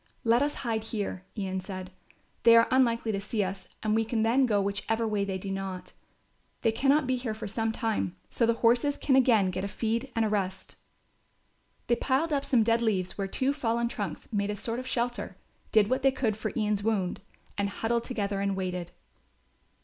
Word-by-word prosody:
"Let 235 +1 +4
us 290 +1 0
hide 220 -2 -1
here," 200 -4 -4
Ian 190 -2 -2
said. 185 -1 -7 0.5
"They 230 0 +7
are 230 0 +6
unlikely 235 -3 +3
to 200 -1 -2
see 210 +1 -1
us 190 0 -5 0.2
and 215 -1 +1
we 225 +1 +3
can 225 0 0
then 250 +4 +3
go 210 -3 +2
whichever 200 +3 -1
way 210 -2 0
they 190 -1 -2
do 195 +1 -5
not. 195 -1 -5 0.7
They 225 - +4
cannot 275 +5 +3
be 255 0 +1
here 240 -3 -3
for 220 -1 -6
some 225 +2 -1
time, 215 - -1 0.2
so 230 - +2
the 230 - +3
horses 245 +5 +3
can 265 - +2
again 225 -8 +4
get 185 +1 -3
a - - -1
feed 230 +5 -2
and 225 -1 +2
a - - +2
rest." 190 -3 -2 1.1
They 240 - +2
piled 280 +6 +1
up 280 -1 +1
some 240 -4 +4
dead 230 +1 +2
leaves 190 -6 0
where 195 -1 -2
two 260 +8 0
fallen 235 -4 0
trunks - - -5
made 200 0 0
a 210 - -1
sort 230 +4 -3
of 255 - -7
shelter, 240 -1 -2 0.3
did 215 -2 +5
what 255 +4 0
they 270 0 +4
could 240 -5 0
for 215 - -3
Ian's 210 -2 +1
wound 200 -5 -1 0.3
and 200 0 0
huddled 230 +3 -1
together 205 -5 -2
and 200 -1 0
waited. 180 -2 -3
220 Hz, 205 wpm, -28 LUFS, 200-235 Hz, 1.1 s, They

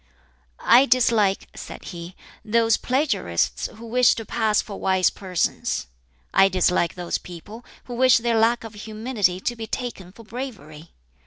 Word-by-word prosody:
"I 255 +4 +5
dislike," 230 -5 +2
said - - -9
he, 175 +1 -8 0.3
"those 225 +1 +3
plagiarists 255 - 0
who 225 +2 -11
wish 245 +1 +4
to 225 - -6
pass 215 -2 +1
for 200 - -5
wise 190 -1 +2
persons. 180 - -2 0.5
I 195 - +6
dislike 180 -2 +1
those 175 -1 -3
people 205 +7 -11 0.2
who 245 - -8
wish 255 +1 +5
their 230 -1 +1
lack 230 +2 +2
of 225 -1 -9
humility 215 -3 -2
to 240 - -2
be 225 -1 -7
taken 220 -7 -5
for 230 +4 -15
bravery. 205 - -8
220 Hz, 150 wpm, -23 LUFS, 185-235 Hz, 0.5 s, I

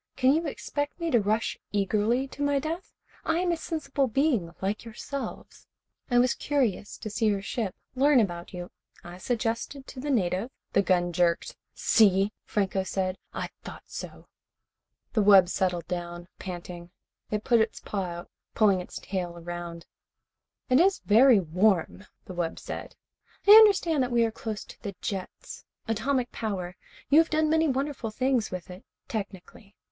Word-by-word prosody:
Can 260 +1 +4
you 325 +1 0
expect 290 +2 -4
me 335 -1 -1
to 240 - +5
rush 215 +3 0
eagerly 210 +6 +1
to 285 - -9
my 285 0 +2
death? 320 +6 -4 0.3
I 325 - +1
am 355 0 +1
a - - +2
sensible 315 -4 -2
being 245 - +1
like 200 +2 -2
yourselves. 250 +4 -7 0.4
I 245 - +3
was 245 0 +4
curious 250 -8 -1
to 215 - -6
see 220 +1 +1
your 200 -2 +1
ship, 210 -2 -3 0.2
learn 275 +1 +4
about 175 -5 -2
you. 175 -1 -7 0.3
I 175 +1 -10
suggested 235 +5 -2
to 265 - -10
the 290 +3 -4
native 195 -3 +1
" - - -58
The 200 - +5
gun 175 -2 +1
jerked. 170 0 +1 0.2
"See," 200 -1 +4
Franco 195 -2 0
said. 190 0 -2
"I - - -4
thought - - -9
so." - - -8 0.9
The 215 - +3
wub 195 -3 +7
settled 180 -3 0
down, 175 -1 -5
panting. 175 -1 -7 0.4
It 210 0 -2
put 235 -2 +4
its 220 0 -1
paw 195 -2 -3
out, 175 0 -7 0.2
pulling 200 -4 +4
its - - -9
tail 180 -3 -4
around 170 0 -6 0.8
it. - - 0
"It 255 - +6
is 385 0 +3
very 230 +2 +6
warm," 185 +2 +1 0.2
the 185 - -8
wub 175 -2 -2
said. - - -7 0.5
"I - - +9
understand 400 -8 +7
that 250 0 0
we 235 -1 +4
are 225 - -1
close 220 -1 -5
to - - -15
the 200 -4 -6
jets. 190 -2 -6 0.2
Atomic 245 +3 0
power. 185 -5 -4 0.4
You 300 - +8
have 325 - +3
done 310 0 +2
many 320 0 +3
wonderful 270 -3 -2
things 255 0 0
with 185 0 -7
it 180 +2 -11 0.2
technically. 200 -1 -7
215 Hz, 170 wpm, -27 LUFS, 185-270 Hz, 0.9 s, I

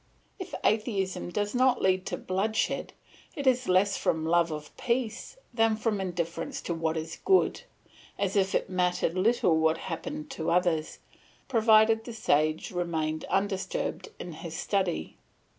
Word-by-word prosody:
If 375 - -6
atheism 205 -5 0
does 205 +3 -2
not 255 0 +3
lead 185 0 +2
to - - -2
bloodshed, 205 +4 -1 0.4
it 285 - -4
is 255 -1 +3
less 195 +2 +3
from 160 -1 0
love 170 +1 +3
of 150 -1 -7
peace 235 - -2 0.2
than 225 -1 +3
from 215 -2 -1
indifference 175 - -3
to 170 - -2
what 165 -1 -1
is 160 0 -5
good; 380 +4 +3 0.6
as 195 0 -1
if 195 -1 +2
it - - +1
mattered 180 -2 0
little 190 -2 +3
what 160 0 +3
happened 295 - -5
to 160 -10 -3
others, 170 -3 +1 0.5
provided 225 -2 +4
the 240 - -6
sage 155 -7 +1
remained 160 -3 -2
undisturbed 200 - -2
in 175 - -6
his 160 +1 -7
study. 190 - -1
190 Hz, 145 wpm, -28 LUFS, 170-225 Hz, 0.6 s, provided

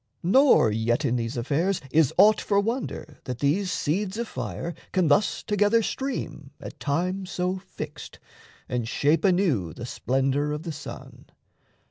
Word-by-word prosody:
Nor 250 - +5
yet 120 +6 0
in 125 -2 +1
these 115 0 -3
affairs 155 +10 0
Is 155 -3 +4
aught 210 +3 +6
for 200 -1 +2
wonder 225 - -3
that 125 -2 -4
these 170 +9 +1
seeds 185 +5 -1
of 235 0 -2
fire 170 -4 -5 0.2
Can 185 -5 +2
thus 170 +8 +2
together 210 +2 +2
stream 160 - -4
at - - -9
time 180 +6 -1
so 180 +1 -2
fixed - - -9 0.5
And 120 -2 -2
shape 150 +6 +1
anew 170 - +2
the 120 - -7
splendour 135 +4 0
of 150 +1 -5
the 170 - -4
sun. 145 -1 -9
165 Hz, 150 wpm, -25 LUFS, 135-195 Hz, 0.5 s, aught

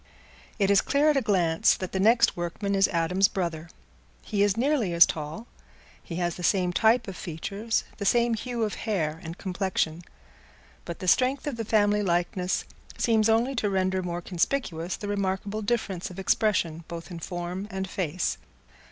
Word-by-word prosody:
It 200 -2 +2
is 200 - +5
clear 290 +2 +3
at 290 - 0
a - - +3
glance 175 -7 +3
that 185 - -5
the 190 - -2
next 230 +4 +4
workman 175 +4 -3
is 195 0 +4
Adam's 180 +3 +2
brother. 170 -4 -3 0.5
He 205 -2 -1
is 205 0 +3
nearly 250 - +1
as 170 0 +8
tall; 155 +8 -5 0.6
he 170 - -8
has 175 -1 -1
the 180 - -7
same 180 -1 +2
type 225 +5 +3
of 195 - -6
features, 200 +8 -3
the 200 - -4
same 235 +3 +3
hue 235 +1 -3
of 210 - -1 0.2
hair 160 -6 -1
and 165 0 -7
complexion; 180 -3 -2 0.8
but 170 - -6
the 185 - -6
strength 255 +8 +3
of 290 -4 -2
the 230 - -3
family 210 -1 +3
likeness 180 0 0 0.3
seems 225 -2 +2
only 230 +4 +2
to 210 -2 +1
render 190 -1 0
more 175 -1 -4
conspicuous 175 -2 -1
the 205 - -6
remarkable 200 +1 -2
difference 205 -5 -2
of 180 - -11
expression 185 -4 +1
both 170 +2 -8
in 170 - -6
form 175 +3 -5
and 190 -1 -4
face. 180 -2 -2
190 Hz, 175 wpm, -27 LUFS, 175-215 Hz, 0.8 s, as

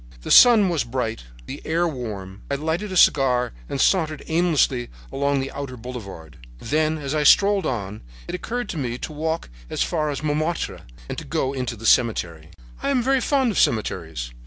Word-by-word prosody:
"The - - -4
sun 225 -6 +8
was 165 -4 0
bright, 115 - -3 0.2
the - - -7
air 170 +2 +1
warm. 105 - -6
I 140 - 0
lighted 160 +8 -2
a 185 - -1
cigar 125 -6 +4 0.2
and 140 - -3
sauntered 155 -5 +2
aimlessly 160 -7 +1 0.2
along 140 0 0
the 135 - -5
outer 135 -3 -6
boulevard. 100 - -9 0.2
Then, 155 - 0
as 140 -2 -4
I 155 - +1
strolled 200 +6 +5
on, 105 -4 -4 0.3
it - - -6
occurred 240 +7 -3
to 165 - -4
me 120 -3 -3
to 155 - -6
walk 160 +2 -3 0.2
as - - 0
far 155 -3 -1
as 145 +1 -4
Montmartre 155 +3 -2 0.3
and - - -6
go 135 +1 -1
into 125 -3 -3
the 115 +1 -10
cemetery. 85 -11 +2 0.3
"I - - -1
am 260 -3 +2
very 265 +1 +2
fond 265 -2 +2
of - - -1
cemeteries. 80 - -1
140 Hz, 180 wpm, -23 LUFS, 115-165 Hz, 0.3 s, sun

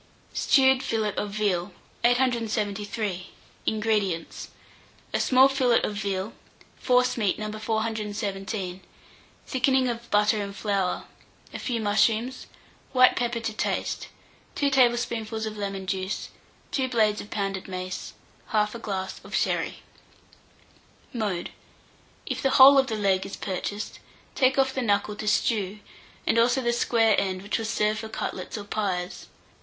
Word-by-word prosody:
STEWED 265 -2 +4
FILLET 220 -5 -1
OF 210 - -2
VEAL. 200 -3 -1 0.3
873. 215 -5 0 0.4
INGREDIENTS. 210 -6 -1 0.7
A - - +1
small 260 +1 +6
fillet 260 -3 +2
of - - -1
veal, 200 0 -3 0.5
forcemeat 250 -5 +2
No. 215 0 -4
417, 210 -3 -3 0.6
thickening 260 0 +2
of 235 -1 -4
butter 210 +1 +3
and 200 -1 -5
flour, 200 -4 -1 0.5
a - - -5
few 240 -3 -2
mushrooms, 220 +4 +1 0.5
white 255 -1 +6
pepper 240 -1 -1
to 225 -1 -3
taste, - - -2 0.5
2 285 -1 +1
tablespoonfuls 235 -3 +1
of 215 -1 -5
lemon 195 -2 -4
juice, 190 +1 -3 0.4
2 265 -2 0
blades 215 -4 +2
of 205 - -11
pounded 195 -2 -3
mace, 185 -1 -5 0.4
1/2 215 +1 0
glass 190 -3 -4
of - - -6
sherry. - - -1 1.3
Mode. 205 -7 -2 0.7
If - - -3
the 270 - +2
whole 275 +1 +10
of 265 - +2
the 220 - -2
leg 195 -2 +2
is 195 - -6
purchased, 205 +2 -4 0.3
take 260 0 +3
off 265 -1 +3
the 260 - -1
knuckle 205 -2 +1
to 215 - -5
stew, 210 -2 +1 0.5
and 230 - +3
also 245 +3 +4
the 240 -1 +1
square 230 -2 +3
end, 185 -1 -3
which 205 - -1
will 225 - -3
serve 215 -1 +1
for 220 - -6
cutlets - - -4
or 205 - -5
pies. 195 -3 -3
215 Hz, 135 wpm, -26 LUFS, 200-240 Hz, 1.3 s, whole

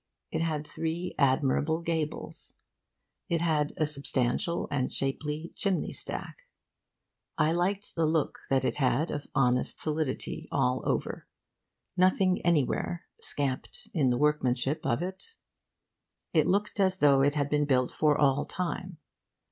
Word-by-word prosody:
It - - -1
had 155 -2 -1
three 165 +3 -3
admirable 140 +3 +2
gables. 160 -2 -3 0.7
It 170 - +1
had 155 -3 +1
a 155 - +2
substantial 140 +2 0
and 130 -3 0
shapely 150 +4 -3
chimney 195 -4 -1
stack. - - -5 1.0
I 155 0 +3
liked 190 +4 0
the 165 -2 +1
look 160 -2 0
that 135 -1 +2
it - - 0
had 140 +3 +1
of 145 -1 -4
honest 125 -2 +2
solidity 155 -3 -2
all 125 +1 +1
over, - - -2 0.7
nothing 185 0 +3
anywhere 170 +1 +1 0.2
scamped 135 -3 -4
in 145 -7 +3
the 120 - +2
workmanship 145 0 +1
of 120 +8 +1
it. 190 - -7 1.0
It - - +4
looked 205 +2 0
as 190 -1 +3
though 140 -4 +5
it 145 +2 +3
had 145 -2 +1
been 150 0 +1
built 130 -3 +2
for 150 -2 +2
all 145 -1 +3
time. 180 0 -4
150 Hz, 135 wpm, -29 LUFS, 135-170 Hz, 1.0 s, though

